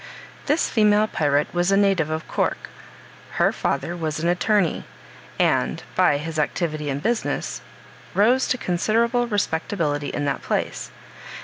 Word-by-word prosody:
This 295 +3 +2
female 210 -1 +3
pirate 145 -7 0
was 175 +2 +1
a 195 - +4
native 195 -6 +2
of 155 0 -4
Cork. - - -2 0.6
Her - - +3
father 170 +5 -2
was 160 -2 -3
an 165 - -1
attorney, 180 0 +1 0.5
and, 60 0 +1
by 145 - +4
his 155 +2 -4
activity 155 -1 -1
in 135 - -1
business, 225 +10 -2 0.5
rose 240 +6 +3
to 255 - 0
considerable 230 +6 +1
respectability 160 -7 -1
in 145 - -3
that 140 -1 -1
place. - - -2
175 Hz, 135 wpm, -23 LUFS, 150-210 Hz, 0.6 s, a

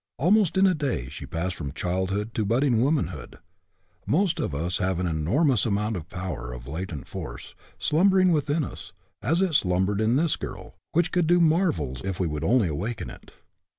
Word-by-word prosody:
Almost 190 +4 +3
in 190 - +5
a 190 - +4
day 135 - -2
she - - -8
passed 90 +3 -2
from 70 -3 -6
childhood 95 +6 -2
to 110 - 0
budding 120 +2 +2
womanhood. 145 +3 -1 0.7
Most 175 +2 +2
of 70 - -2
us 85 +5 -1
have 95 -1 0
an 90 - 0
enormous 95 - +2
amount 105 0 0
of 85 -2 -6
power, 90 -10 -5
of 60 +1 -9
latent 80 -1 -5
force, - - -7 0.2
slumbering 185 +3 +4
within 150 0 +1
us, - - -8 0.3
as 165 - +2
it 185 -4 0
slumbered 95 -2 +2
in 110 +3 +2
this 160 +2 +2
girl, - - -7 0.2
which 170 0 +2
could 175 -3 +2
do 175 +1 +5
marvels 155 - +1
if 95 -2 -3
we 90 - +1
would 75 -1 -3
only 115 +3 +3
awaken 100 +9 -4
it. - - -14
105 Hz, 185 wpm, -26 LUFS, -, 0.7 s, in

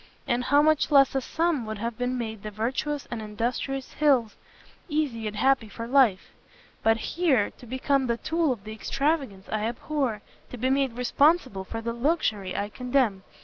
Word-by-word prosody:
and 245 +1 0
how 285 +2 +4
much 310 -1 +3
less 275 -3 +5
a 270 - 0
sum 325 -1 0
would 220 -1 -5
have 230 +2 -4
made 240 -4 -2
the 215 - -5
virtuous 260 +7 -2
and 235 -2 -3
industrious 240 +5 -3
Hills 265 -7 +2 0.5
easy 280 -8 -1
and 210 - -5
happy 250 0 +2
for 230 +2 -6
life! 240 -6 +3 0.5
but 225 0 +3
here, 275 - +1
to 245 - -12
become 260 +2 0
the 235 -1 0
tool 325 +2 0
of 225 -6 -4
the 215 +1 -7
extravagance 270 -4 -1
I 215 0 0
abhor! 240 -2 -2 0.3
to 250 - -8
be 255 +3 0
made 270 -2 +1
responsible 250 - +2
for 225 +3 -5
the 230 +1 -3
luxury 235 - 0
I 205 - -2
condemn! 250 -4 0
245 Hz, 175 wpm, -26 LUFS, 220-280 Hz, 0.5 s, less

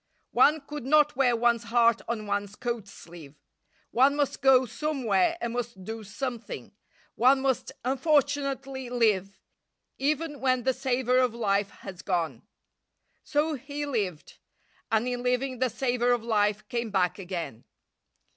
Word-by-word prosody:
One 305 +1 +5
could 295 -1 -7
not 300 +2 +4
wear 250 -2 +3
one's 235 0 +2
heart 230 0 +3
on 225 -2 -3
one's 205 0 -2
coat 235 -4 -4
sleeve. 165 -7 -13 0.6
One 270 +4 +4
must 290 -2 -1
go 265 -1 +6
somewhere 255 - 0
and 235 -1 -3
must 235 -5 -4
do 220 +3 -6
something. 235 +3 -6 0.4
One 260 +3 +4
must 265 -1 -1
unfortunately 275 -2 0
live, 205 -6 +1 0.6
even 295 +1 -1
when 255 -2 +1
the 260 - +2
savour 255 -1 +1
of 250 -3 +1
life 200 -3 +1 0.2
has 185 -2 -7
gone. 165 - -1 0.8
So 305 +2 0
he 285 +1 -5
lived, 205 - -3 0.5
and 225 +2 +2
in 245 -1 -2
living 250 +1 -1
the 255 0 +2
savour 245 0 +1
of 240 -2 -1
life 210 -2 +1
came 235 0 -2
back 190 -2 +1
again. 175 - -5
245 Hz, 140 wpm, -27 LUFS, 210-270 Hz, 0.8 s, go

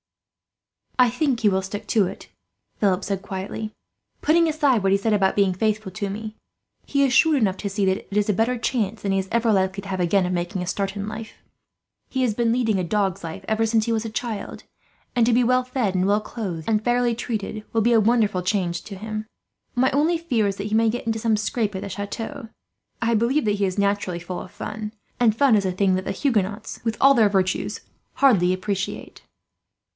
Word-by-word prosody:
"I 250 -2 +5
think 255 -1 0
he 215 - +4
will 190 -1 +1
stick 205 +2 -6
to 210 -4 +3
it," - - -9 0.5
Philip 195 -2 +2
said 195 -1 -2
quietly. 195 +3 -5 0.5
"Putting 335 +2 +4
aside 290 -7 +2
what 195 - +3
he 195 - +5
says 215 +2 0
about 195 -2 +2
being 195 -2 +3
faithful 215 0 -1
to 200 +2 -3
me, 215 +2 -6 0.5
he 280 -1 +1
is 265 -2 +2
shrewd 320 +1 +5
enough 195 -6 +1
to 200 - -3
see 200 0 0
that 190 0 +2
it 200 - -6
is 210 0 +2
a - - +4
better 230 +5 +1
chance 225 -3 -1
than 200 - -1
he 195 - +2
is 190 - -3
ever 230 -1 +2
likely 190 0 +1
to 195 - -11
have, 190 -1 -2
again, 180 +2 +2
of 180 - -1
making 175 +1 -2
a 180 - -4
start 195 +1 -2
in 200 0 -4
life. 220 0 -7 0.8
He 260 - -1
has 245 -4 +2
been 230 +1 +1
leading 225 -5 +1
a - - 0
dog's 195 0 -1
life, 165 +4 -7
ever 220 +1 +1
since 220 -1 +2
he 230 - -1
was 225 0 0
a - - -3
child; 225 -2 -5 0.5
and 240 -2 +4
to 240 - +3
be 245 +2 +4
well 255 +1 +3
fed, 250 -6 -1
and 185 +1 +2
well 205 +1 +3
clothed, 185 -8 -5
and 215 -1 +1
fairly 240 0 +2
treated 215 -2 -4
will 225 - +2
be 235 +2 +3
a 225 - +6
wonderful 215 -4 +2
change 180 -3 -1
for 200 - -8
him. 215 +2 -5 0.5
"My 260 +2 +3
only 310 +5 +2
fear 245 -11 0
is 195 - -1
that 200 - -4
he 215 - -1
may 225 0 +4
get 245 +3 -3
into 225 0 0
some 220 -1 +2
scrape 215 -1 -1
at 190 - -3
the - - -5
chateau. 225 +6 -5 0.5
I 230 +1 +2
believe 235 +6 +2
that 210 - +2
he 200 -1 +1
is 185 0 -3
naturally 200 -3 0
full 180 +1 -5
of 180 - -11
fun, 215 0 -6 0.3
and 230 -3 +4
fun 265 -1 +4
is 200 -2 +2
a 185 - +1
thing 190 +1 +2
that 185 0 -3
the - - -2
Huguenots, 215 -6 -1
with 225 -1 -1
all 275 +1 +7
their 225 -5 +4
virtues, 190 -1 0 0.3
hardly 200 -10 +4
appreciate." 195 +1 -4
215 Hz, 230 wpm, -23 LUFS, 195-235 Hz, 0.8 s, all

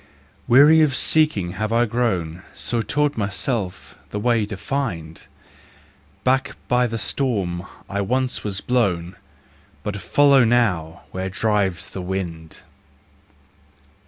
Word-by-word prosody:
Weary 145 +6 +7
of 145 -4 +3
Seeking 150 - +1
had 110 +3 -3
I 120 +1 +3
grown, 95 -8 -1
So 120 -1 -1
taught 145 +3 0
myself 100 -1 -3
the - - -4
way 115 -1 +1
to 105 -2 -6
Find: 95 - -4 1.0
Back 135 +2 +1
by 125 0 +3
the 115 0 -3
storm 100 -9 -1 0.2
I 100 +1 -2
once 130 +5 -1
was 100 -2 -2
blown, 95 -8 0 0.7
But 105 -1 -3
follow 140 -2 +5
now, 105 -9 +1
where 95 0 -3
drives 100 -3 0
the 95 - -5
wind. 90 -4 -5
105 Hz, 120 wpm, -22 LUFS, 95-125 Hz, 1.0 s, Weary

